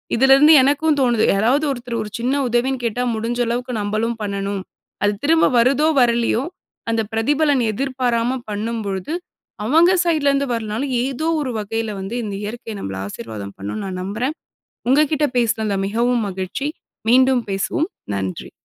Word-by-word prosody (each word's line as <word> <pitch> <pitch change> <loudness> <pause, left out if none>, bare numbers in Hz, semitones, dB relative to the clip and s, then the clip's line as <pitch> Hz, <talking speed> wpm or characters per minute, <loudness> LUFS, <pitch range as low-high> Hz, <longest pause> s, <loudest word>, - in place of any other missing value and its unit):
இதுலேருந்து 270 +5 +6
எனக்கும் 290 +3 +2
தோணுது, 240 -4 +2
யாராவது 245 +10 +2
ஒருத்தர் 240 -3 -4
ஒரு 215 - -5
சின்ன 250 +3 0
உதவின்னு 245 +2 0
கேட்டா 240 +2 -1
முடிஞ்ச 230 +2 -2
அளவுக்கு 245 +2 -2
நம்மளும் 215 +3 -1
பண்ணணும். 200 -1 -3 0.4
அது 205 0 +3
திரும்ப 325 +2 +4
வருதோ! 275 +6 +3
வரலயோ! 235 0 +2 0.5
அந்த 225 0 +1
பிரதிபலன் 285 +3 +2
எதிர்பாராம 250 0 -1
பண்ணும்பொழுது, 210 - -3 0.5
அவங்க 325 +9 +5
சைட்லருந்து 280 -4 +2
வரலனாலும், 230 +4 -2
ஏதோ 275 +4 -2
ஒரு 260 -4 -3
வகையில 215 +1 -3
வந்து 195 +5 -5
இந்த 200 -2 -4
இயற்கை 225 +1 -6
நம்மள 95 - -5
ஆசீர்வாதம் 100 -1 -7
பண்ணும் 100 - -4
நான் 185 -1 -4
நம்புறேன். 235 - -2 0.6
உங்கக்கிட்ட 300 +2 +3
பேசுன 230 -2 +1
அந்த 200 -1 0
மிகவும் 235 +3 +1
மகிழ்ச்சி 190 +9 -3 0.4
மீண்டும் 260 0 +5
பேசுவோம். 250 - -1 0.2
நன்றி. 95 -2 -4
235 Hz, 140 wpm, -20 LUFS, 210-270 Hz, 0.6 s, இதுலேருந்து